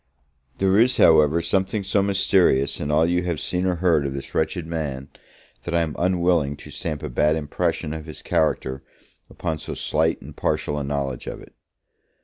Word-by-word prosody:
There 95 Hz, +1 st, +3 dB
is, 125 Hz, +2 st, +4 dB
however, 80 Hz, +1 st, +5 dB
something 95 Hz, +4 st, 0 dB
so 100 Hz, +1 st, +1 dB
mysterious 95 Hz, -8 st, +2 dB
in 75 Hz, -, -3 dB
all 75 Hz, +2 st, +3 dB
you 90 Hz, +1 st, +1 dB
have 85 Hz, -4 st, -2 dB
seen 90 Hz, +6 st, -1 dB
or 90 Hz, -, +1 dB
heard 85 Hz, -4 st, +2 dB
of 70 Hz, -, -5 dB
this 70 Hz, -, -7 dB
wretched 80 Hz, +1 st, -1 dB
man, 75 Hz, -5 st, -4 dB, 0.5 s
that 85 Hz, -, -3 dB
I 85 Hz, -, +3 dB
am 80 Hz, -2 st, -4 dB
unwilling 85 Hz, -5 st, +1 dB
to -, -, -11 dB
stamp 75 Hz, -3 st, -4 dB
a -, -, -2 dB
bad 75 Hz, +5 st, +2 dB
impression 75 Hz, 0 st, -2 dB
of 80 Hz, 0 st, -7 dB
his 80 Hz, -, -9 dB
character 75 Hz, -5 st, 0 dB, 0.5 s
upon 80 Hz, -1 st, -4 dB
so -, -, -6 dB
slight 80 Hz, +2 st, 0 dB
and -, -, -12 dB
partial 75 Hz, 0 st, -1 dB
a -, -, -3 dB
knowledge 70 Hz, -2 st, -3 dB
of -, -, -5 dB
it. -, -, -15 dB
80 Hz, 185 wpm, -23 LUFS, 75-90 Hz, 0.5 s, however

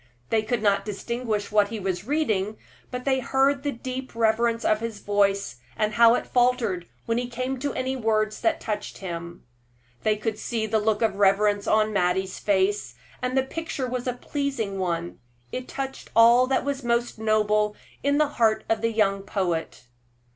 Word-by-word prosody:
They 225 Hz, -, +3 dB
could 225 Hz, +1 st, -2 dB
not 200 Hz, -1 st, +3 dB
distinguish 215 Hz, +1 st, -3 dB
what 210 Hz, -1 st, +4 dB
he 220 Hz, +1 st, -5 dB
was 190 Hz, +1 st, -3 dB
reading, 220 Hz, -9 st, 0 dB, 0.3 s
but 250 Hz, 0 st, -5 dB
they 265 Hz, -1 st, +2 dB
heard 270 Hz, +2 st, +2 dB
the 285 Hz, 0 st, -1 dB
deep 255 Hz, 0 st, -6 dB
reverence 230 Hz, +1 st, +2 dB
of 215 Hz, -, +3 dB
his 230 Hz, -1 st, -4 dB
voice, 200 Hz, -9 st, +1 dB, 0.2 s
and 215 Hz, 0 st, 0 dB
how 235 Hz, 0 st, +6 dB
it -, -, -2 dB
faltered 245 Hz, -8 st, +1 dB, 0.2 s
when 230 Hz, +1 st, 0 dB
he 245 Hz, 0 st, -3 dB
came 255 Hz, +2 st, -3 dB
to 285 Hz, +2 st, -1 dB
any 260 Hz, +1 st, -1 dB
words 215 Hz, -3 st, 0 dB
that 335 Hz, -, +1 dB
touched 210 Hz, -1 st, -4 dB
him. 170 Hz, -2 st, -7 dB, 0.6 s
They 215 Hz, -1 st, +2 dB
could 215 Hz, 0 st, -3 dB
see 225 Hz, -2 st, -2 dB
the 220 Hz, 0 st, +1 dB
look 215 Hz, +1 st, +1 dB
of 210 Hz, -3 st, +1 dB
reverence 205 Hz, +1 st, +3 dB
on 215 Hz, 0 st, +3 dB
Mattie's 185 Hz, 0 st, 0 dB
face, 195 Hz, -, +1 dB, 0.3 s
and 250 Hz, +1 st, -1 dB
the 265 Hz, -, +4 dB
picture 290 Hz, -1 st, -4 dB
was 250 Hz, 0 st, -3 dB
a 250 Hz, -, +1 dB
pleasing 245 Hz, -7 st, -3 dB
one 170 Hz, -2 st, -2 dB, 0.3 s
it 255 Hz, 0 st, -5 dB
touched 270 Hz, -1 st, -5 dB
all 235 Hz, +2 st, +7 dB
that 265 Hz, 0 st, +1 dB
was 280 Hz, -1 st, -2 dB
most 235 Hz, -1 st, 0 dB
noble 210 Hz, -1 st, +2 dB, 0.3 s
in 285 Hz, +1 st, +2 dB
the 305 Hz, 0 st, +4 dB
heart 225 Hz, -6 st, +2 dB
of 225 Hz, -1 st, +1 dB
the 230 Hz, 0 st, +1 dB
young 200 Hz, -3 st, +1 dB
poet. 175 Hz, -9 st, -2 dB
220 Hz, 180 wpm, -25 LUFS, 205-250 Hz, 0.6 s, all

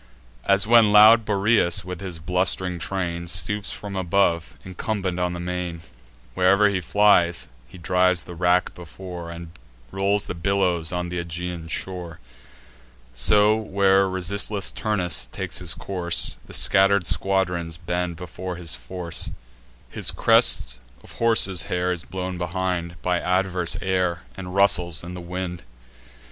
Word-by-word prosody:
As 100 Hz, 0 st, +3 dB
when 115 Hz, -2 st, +5 dB
loud 110 Hz, +2 st, +7 dB
Boreas, 100 Hz, -4 st, +1 dB
with 90 Hz, 0 st, -7 dB
his 90 Hz, -4 st, -6 dB
blust'ring 90 Hz, +1 st, 0 dB
train, 85 Hz, -1 st, -4 dB
Stoops 100 Hz, +4 st, -2 dB
from 100 Hz, -1 st, -7 dB
above, 90 Hz, -3 st, 0 dB
incumbent 95 Hz, -1 st, -3 dB
on 90 Hz, 0 st, -1 dB
the 85 Hz, -, -6 dB
main; 90 Hz, -1 st, -4 dB, 0.5 s
Where'er 100 Hz, +5 st, +4 dB
he 95 Hz, -2 st, -2 dB
flies, 90 Hz, -5 st, +3 dB, 0.2 s
he 65 Hz, -, -14 dB
drives 90 Hz, +1 st, +1 dB
the 90 Hz, -, -10 dB
rack 90 Hz, +1 st, +1 dB
before, 90 Hz, 0 st, -9 dB
And 85 Hz, -1 st, -9 dB, 0.4 s
rolls 100 Hz, +1 st, 0 dB
the -, -, -5 dB
billows 90 Hz, -2 st, 0 dB
on 90 Hz, -1 st, -3 dB
th' 90 Hz, -1 st, -2 dB
Aegaean 85 Hz, 0 st, -6 dB
shore: 85 Hz, -2 st, -5 dB, 0.9 s
So, 105 Hz, -, +3 dB
where 100 Hz, -2 st, +2 dB
resistless 100 Hz, +2 st, 0 dB
Turnus 90 Hz, -7 st, -1 dB
takes -, -, -5 dB
his -, -, -1 dB
course, 90 Hz, -3 st, +1 dB
The -, -, -12 dB
scatter'd 100 Hz, -1 st, +3 dB
squadrons 90 Hz, -4 st, 0 dB
bend 90 Hz, 0 st, -3 dB
before 90 Hz, +1 st, -7 dB
his 85 Hz, -2 st, -6 dB
force; 85 Hz, +8 st, -3 dB, 0.6 s
His -, -, +2 dB
crest -, -, +2 dB, 0.2 s
of -, -, -16 dB
horses' 105 Hz, -6 st, +3 dB
hair 90 Hz, 0 st, 0 dB
is 90 Hz, -2 st, -3 dB
blown 95 Hz, -1 st, -5 dB
behind 90 Hz, -1 st, -3 dB
By 90 Hz, -1 st, +1 dB
adverse 90 Hz, -1 st, 0 dB
air, 90 Hz, -2 st, -1 dB
and 95 Hz, -1 st, -8 dB
rustles 90 Hz, -4 st, +2 dB
in 90 Hz, +1 st, -8 dB
the 90 Hz, -, -7 dB
wind. 90 Hz, 0 st, -5 dB
90 Hz, 140 wpm, -23 LUFS, 85-95 Hz, 0.9 s, loud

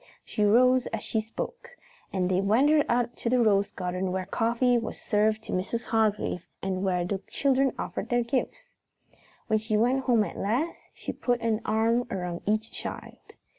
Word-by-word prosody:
She 210 Hz, -, -1 dB
rose 250 Hz, +4 st, +4 dB
as 225 Hz, -, -4 dB
she 220 Hz, -, 0 dB
spoke, 480 Hz, -, -7 dB, 0.3 s
and 185 Hz, -2 st, 0 dB
they 185 Hz, +1 st, +2 dB
wandered 280 Hz, +9 st, +4 dB
out 240 Hz, 0 st, +1 dB
to 235 Hz, -, -2 dB
the 250 Hz, +1 st, +3 dB
rose 205 Hz, -3 st, +3 dB
garden 180 Hz, 0 st, -3 dB
where 185 Hz, 0 st, -2 dB
coffee 235 Hz, +4 st, +1 dB
was 225 Hz, -, -6 dB
served 215 Hz, 0 st, +1 dB
for -, -, -5 dB
Mrs. 195 Hz, +6 st, -2 dB
Hargrave 215 Hz, -5 st, 0 dB
and 190 Hz, -1 st, -2 dB
where 180 Hz, -2 st, +1 dB
the 195 Hz, +2 st, -2 dB
children 270 Hz, -1 st, +2 dB
offered -, -, -4 dB
their 240 Hz, 0 st, +2 dB
gifts. 285 Hz, -, -3 dB, 0.7 s
When 220 Hz, -, +2 dB
she 215 Hz, 0 st, -1 dB
went 255 Hz, +4 st, +2 dB
home 235 Hz, -4 st, +4 dB
at -, -, -6 dB
last, 250 Hz, +12 st, -2 dB
she -, -, -5 dB
put 245 Hz, -1 st, 0 dB
an 225 Hz, -1 st, 0 dB
arm 230 Hz, +3 st, +2 dB
around 180 Hz, -3 st, -4 dB
each 215 Hz, +1 st, 0 dB
child. -, -, -7 dB
220 Hz, 175 wpm, -27 LUFS, 200-245 Hz, 0.7 s, rose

